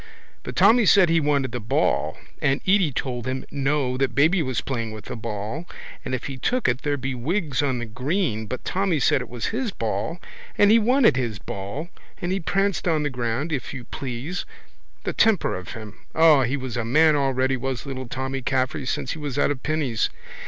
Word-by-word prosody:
But - - -7
Tommy 230 -2 +6
said 185 -3 +6
he 165 0 +4
wanted 140 -4 +1
the 125 - -3
ball 110 - 0 0.2
and 135 0 +2
Edy 190 -5 +4
told 125 -1 -3
him 130 0 -3
no 135 -2 0
that 130 -2 0
baby 160 +6 +4
was 130 -5 -1
playing 115 -5 -3
with 110 -1 -9
the - - -5
ball 115 - -4 0.4
and 130 - -2
if 125 - -5
he 135 -2 -5
took 250 - 0
it 125 +2 +1
there'd 145 -2 -1
be 130 +1 -2
wigs 150 +3 -1
on 135 -3 0
the 120 - -3
green 125 - -1
but 130 - -5
Tommy 185 -4 +1
said 135 - +3
it 125 - -7
was 120 -1 -4
his 245 0 -1
ball 110 - -3 0.4
and 205 0 +6
he 230 - +7
wanted 235 - +4
his 120 -5 -1
ball 100 - -6 0.3
and 175 - -2
he 190 - 0
pranced 195 +2 0
on 155 -3 +2
the 145 - -1
ground, 125 +5 -2
if 135 -1 -3
you 130 - -6
please. 135 +8 -4 0.6
The - - -2
temper 220 -5 +3
of 90 -1 -7
him! 110 -2 -9 0.2
O, 160 -3 +6
he 130 +3 0
was 130 -3 -5
a 120 - 0
man 155 +7 +4
already 135 -2 +1
was 130 0 -3
little 130 -2 -5
Tommy 130 +2 -3
Caffrey 130 +1 -1
since 130 - -2
he 160 - -5
was 145 -3 -4
out 145 - +3
of 135 -3 -4
pinnies. 150 -7 0
135 Hz, 210 wpm, -24 LUFS, 125-160 Hz, 0.6 s, he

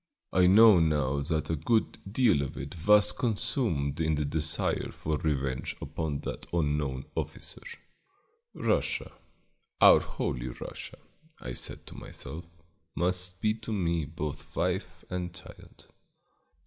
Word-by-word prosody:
I 90 -1 +5
know 105 0 +8
now 75 -4 +2
that 80 +2 -1
a - - +1
good 110 +10 +1
deal 110 - +4
of 70 - -5
it 70 +2 -6
was 105 0 +7
consumed 100 - 0
in 80 -1 +2
the 75 0 -1
desire 75 +1 0
for 75 -1 -2
revenge 70 -4 -1
upon 75 -3 -3
that - - -6
unknown 75 -5 0
officer. - - -5 0.9
Russia, - - 0 0.7
our - - +9
Holy 60 0 -3
Russia, - - -8 0.4
I 60 - -6
said - - -4
to - - -10
myself, 85 +2 -7 0.5
must 90 +1 -1
be 110 0 +3
to 110 +1 -6
me 85 -6 0
both 75 -1 -6
wife 90 0 -2
and 90 -1 -3
child. - - -14
80 Hz, 130 wpm, -29 LUFS, 75-95 Hz, 0.9 s, our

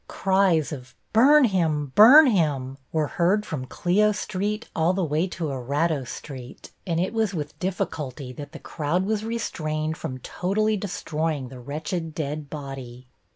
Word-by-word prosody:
Cries 190 -6 +2
of 130 -4 -8 0.2
"Burn 280 +7 +7
him! 160 - +1
Burn 265 +9 +9
him!" 145 - 0
were 155 -1 +1
heard 185 +7 +1
from 135 -5 -4
Clio 210 +8 +2
Street 210 +2 -3
all 165 +3 +2
the 190 0 0
way 160 +3 0
to 170 -4 -4
Erato 140 +3 -1
Street, 130 -4 -9 0.2
and 165 -2 0
it 185 +5 -1
was 220 -4 0
with 150 -2 -5
difficulty 145 -8 -4
that 145 +2 -9
the 160 - -8
crowd 165 +4 -2
was 215 0 -1
restrained 160 -9 -3
from 130 - -5
totally 210 - -1
destroying 160 -8 -3
the 130 -1 -10
wretched 155 +5 -4
dead 150 -1 -4
body. 135 -4 -8
160 Hz, 155 wpm, -25 LUFS, 145-195 Hz, 0.2 s, Burn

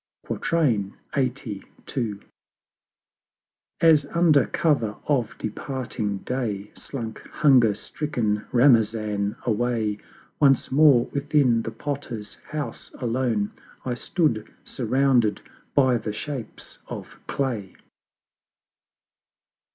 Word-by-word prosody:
LXXXII. 125 -4 -1 2.2
As 155 -3 +6
under 165 -3 +4
cover 120 -10 +1
of 125 -7 0
departing 110 -3 -3
Day 105 -6 -3
Slunk 115 -5 -6
hunger 125 -8 +4
stricken 110 -9 -2
Ramazan 110 -5 +3
away, 110 -2 0 0.4
Once 135 -3 +4
more 135 -4 +6
within 140 -5 +3
the - - -4
Potter's 130 -7 -5 0.2
house 150 -1 -5
alone 115 -4 0 0.3
I 125 - -1
stood, 120 - 0
surrounded 125 -2 +2 0.3
by 130 -3 +4
the 110 -1 -4
Shapes 130 0 -7
of - - -8
Clay. 120 -8 -2
125 Hz, 80 wpm, -25 LUFS, 110-140 Hz, 2.2 s, As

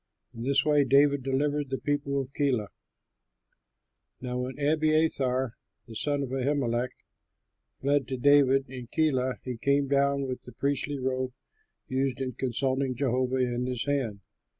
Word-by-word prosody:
In 115 - -8
this 135 +2 +2
way 150 -1 +4
David 140 +1 +4
delivered 145 +2 0
the 135 - -1
people 145 -1 -1
of 135 0 -5
Keilah. 130 -8 0 1.5
Now 125 0 -3
when 130 +2 -4
Abiathar, 145 -4 +2 0.3
the 115 - -11
son 145 +4 0
of 135 - -4
Ahimelech, 130 -2 0 0.9
fled 140 -2 +1
to 130 - -3
David 135 0 +4
in 125 -2 -8
Keilah, 130 -3 +1
he 125 -2 -4
came 140 +3 +2
down 140 0 +2
with 130 -1 -4
the 125 - -13
priestly 140 +1 -1
robe 130 -1 -2 0.5
used 130 0 -1
in 130 -1 -2
consulting 130 +1 -1
Jehovah 130 0 0
in 125 -1 0
his 125 -2 -2
hand. 130 -8 -1
135 Hz, 145 wpm, -28 LUFS, 125-140 Hz, 1.5 s, way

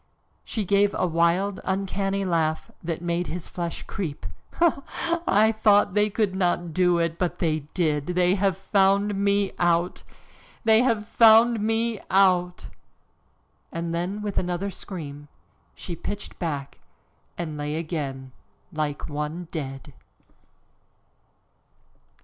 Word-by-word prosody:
She 215 -3 -3
gave 200 +1 +3
a - - +1
wild, 175 +4 +1
uncanny 195 +1 -1
laugh 160 -3 0
that 165 0 -3
made 175 +1 -1
his 175 0 -5
flesh 170 -2 -5
creep. 160 - -5 0.3
"Ha! 335 -4 +2
ha! 335 0 -3
I 215 +2 +5
thought 205 -3 +3
they 210 +1 +3
could 205 -2 0
not 175 -3 0
do 180 -1 +3
it, 170 -1 -1
but 180 -2 -1
they 155 -3 0 0.2
did. 150 -5 0
They 180 0 +2
have 195 -2 +1
found 200 +1 +2
me 200 0 +1
out! 175 0 +1 0.6
They 220 0 +5
have 225 -4 +1
found 230 +1 +6
me 225 +1 0
out!" 180 -2 +3 1.1
And 165 0 -3
then, 185 +5 -2
with 205 -2 -1
another 180 +2 -2
scream, 145 -7 -8 0.5
she 175 - -6
pitched 205 +5 -6
back 145 -5 -4 0.6
and 165 -3 -4
lay 150 0 -3
again 145 -5 -4 0.4
like 150 -2 -3
one 155 +3 -4
dead. 135 -2 -6
180 Hz, 125 wpm, -25 LUFS, 165-200 Hz, 1.1 s, found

